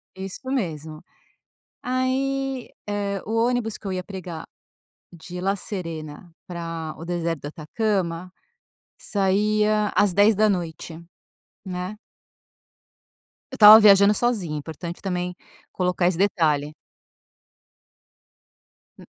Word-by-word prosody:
Isso 195 +8 -7
mesmo. 160 - -3 0.8
Aí, 265 +1 -1 0.2
eh, 200 -1 -2
o 220 - -4
ônibus 245 -3 -1
que - - -21
eu 195 - -2
ia 185 0 -3
pegar 175 -4 -8 0.7
de 175 +2 -8
La 195 +2 +1
Serena 165 -4 -6
para 165 -3 -5
o 165 - -8
deserto 170 -2 -2
do - - -6
Atacama, 180 +1 -2 0.7
saía 210 +1 +1
às 200 -3 +3
10h, 190 -6 +1 0.6
né. 185 +3 -5 1.5
Eu - - -6
estava 215 +1 +10
viajando 200 -1 +7
sozinha, 205 -11 -1
importante 160 +3 -7
também 180 -2 -3 0.4
colocar 180 -1 0
esse 175 -2 0
detalhe. 155 -6 +1 2.3
Hum. - - -12
185 Hz, 100 wpm, -24 LUFS, 165-210 Hz, 2.3 s, estava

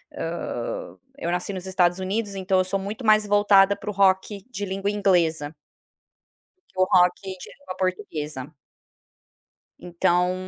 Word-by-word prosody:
hã, - - -4 0.2
eu 170 - -3
nasci 180 +3 -2
nos 185 -1 -6
Estados 180 -2 +2
Unidos, 200 +2 -2
então 190 0 +1
eu - - +3
sou 185 +2 -2
muito 205 +6 -6
mais 215 -1 +5
voltada 205 -1 +5
pro 210 - -6
rock 195 0 +1
de 205 -4 -4
língua 195 +1 -2
inglesa 170 -7 +1 1.2
que 185 - -6
o - - +6
rock 180 -1 +4
de 190 -1 -6 0.2
língua 285 -10 -9
portuguesa. 155 -6 -4 1.3
Então, 180 +1 +1
190 Hz, 135 wpm, -24 LUFS, 180-200 Hz, 1.3 s, o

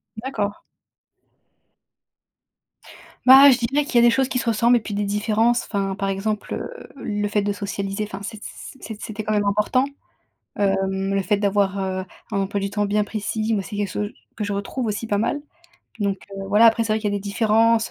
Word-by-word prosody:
D'accord. 215 -4 -3 2.7
Bah, 270 +2 +10
je 250 - +4
dirais 270 +5 0
qu'il 255 - -7
y - - +7
a - - +6
des 235 - +5
choses 265 +2 +1
qui 250 - -1
se 235 - -4
ressemblent 235 +2 +4
et - - 0
puis 215 -1 -7
des 205 +1 -1
différences, 215 +4 +1
enfin, 195 -2 -2
par 195 -1 -2
exemple, 205 +2 -2
heu, - - -6
le 210 -5 -2
fait 205 0 +1
de 205 0 0
socialiser, 200 0 -3
enfin, 200 -1 -8
c'ét 210 +1 -7
c - - -7 0.2
c - - -18
c'ét 220 -2 -8
c'était 215 0 -5
quand 215 +1 -1
même 205 -1 +1
important. 210 +6 +2 0.7
Hem, 195 -1 0
le 195 - +1
fait 205 +3 +1
d'avoir, 200 -1 +1
heu, 190 -1 -2 0.3
un 200 - 0
emploi 195 +1 -1
du 200 0 -2
temps 205 -1 0
bien 210 +1 +1
précis, 215 +1 -2
moi, 200 - 0
c'est 205 - -7
quelque 205 -1 -1
chose 210 +2 -3 0.2
que 215 - -2
je 205 - -2
retrouve 200 +5 -3
aussi 210 +2 -3
pas 205 -2 0
mal 290 +7 0 0.6
donc 200 -1 0 0.2
heu, 195 - -5
voilà, 210 +3 +5
après, 230 0 +5
c'est 215 - +1
vrai 220 - 0
qu'il 210 -1 -1
y - - -2
a - - 0
des - - -5
différences, 225 +2 +2
210 Hz, 220 wpm, -22 LUFS, 200-225 Hz, 2.7 s, Bah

